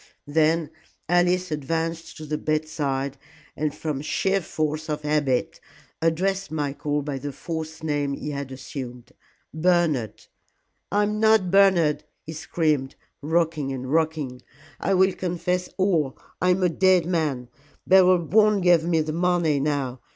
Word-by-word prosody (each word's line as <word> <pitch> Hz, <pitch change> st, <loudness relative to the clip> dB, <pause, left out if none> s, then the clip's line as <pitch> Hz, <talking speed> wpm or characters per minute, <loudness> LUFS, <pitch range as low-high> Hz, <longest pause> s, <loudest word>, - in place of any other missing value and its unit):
Then 160 Hz, +1 st, +1 dB, 0.4 s
Alice 175 Hz, 0 st, +2 dB
advanced 165 Hz, +3 st, -3 dB
to 155 Hz, -, -8 dB
the 150 Hz, 0 st, -3 dB
bedside, 145 Hz, -3 st, -2 dB, 0.4 s
and 155 Hz, 0 st, -1 dB
from 150 Hz, -2 st, -4 dB
sheer 190 Hz, +6 st, 0 dB
force 155 Hz, -1 st, -3 dB
of 150 Hz, 0 st, -3 dB
habit 145 Hz, -4 st, 0 dB, 0.4 s
addressed 190 Hz, +4 st, 0 dB
Michael 145 Hz, -1 st, -2 dB
by 140 Hz, -2 st, -4 dB
the 145 Hz, +2 st, -5 dB
false 160 Hz, +2 st, -6 dB
name 145 Hz, -2 st, -1 dB
he 150 Hz, -, -5 dB
had 140 Hz, -2 st, -5 dB
assumed. 130 Hz, -2 st, -8 dB, 0.4 s
"Bernard 160 Hz, -, +1 dB, 0.3 s
" -, -, -49 dB
"I 205 Hz, +1 st, +3 dB
am 210 Hz, +1 st, -1 dB
not 220 Hz, -4 st, +4 dB
Bernard," 185 Hz, -6 st, +4 dB, 0.2 s
he 160 Hz, -, -6 dB
screamed, 150 Hz, -4 st, -1 dB, 0.3 s
rocking 155 Hz, -2 st, 0 dB
and 130 Hz, +1 st, -4 dB
rocking. 155 Hz, -6 st, 0 dB, 0.4 s
"I 195 Hz, -, +1 dB
will 190 Hz, +1 st, +4 dB
confess 180 Hz, 0 st, -2 dB
all. 170 Hz, -8 st, +1 dB, 0.2 s
I 180 Hz, -, +3 dB
am 180 Hz, +1 st, +2 dB
a 180 Hz, -, +4 dB
dead 185 Hz, 0 st, +3 dB
man. 150 Hz, -8 st, -1 dB, 0.4 s
Beryl 185 Hz, -2 st, +5 dB
won't 210 Hz, +1 st, +3 dB
give 175 Hz, -2 st, +5 dB
me 165 Hz, -1 st, +2 dB
the 155 Hz, 0 st, -3 dB
money 170 Hz, -3 st, +1 dB
now. 135 Hz, -3 st, -2 dB
160 Hz, 145 wpm, -24 LUFS, 145-180 Hz, 0.4 s, Beryl